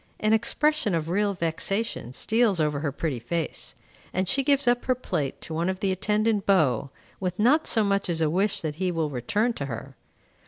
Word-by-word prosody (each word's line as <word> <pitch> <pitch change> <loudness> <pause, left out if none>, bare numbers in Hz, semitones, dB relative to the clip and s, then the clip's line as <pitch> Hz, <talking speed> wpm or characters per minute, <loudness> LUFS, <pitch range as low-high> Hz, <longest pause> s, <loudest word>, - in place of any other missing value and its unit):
An 215 +1 +2
expression 235 - +2
of 160 0 -2
real 200 +2 +1
vexation 175 - -1
steals 220 - +1
over 150 -2 +1
her 145 -1 -2
pretty 140 -2 -3
face, 160 +7 -3 0.4
and 185 +1 -1
she 275 +9 +3
gives 280 -1 +2
up 245 0 +2
her 255 - +2
plate 145 - -3
to 160 - -7
one 170 +3 0
of 190 0 -3
the 195 -2 0
attendant 210 +2 0
beaux, 140 - +3 0.3
with 180 -1 -3
not 265 +9 +3
so 220 - +3
much 200 -2 +1
as 165 -2 0
a 160 - +2
wish 195 +6 +1
that 155 -2 -4
he 185 0 0
will 160 -3 -1
return 215 - 0
to 140 -10 -5
her. 130 +2 -7
190 Hz, 200 wpm, -26 LUFS, 155-220 Hz, 0.4 s, she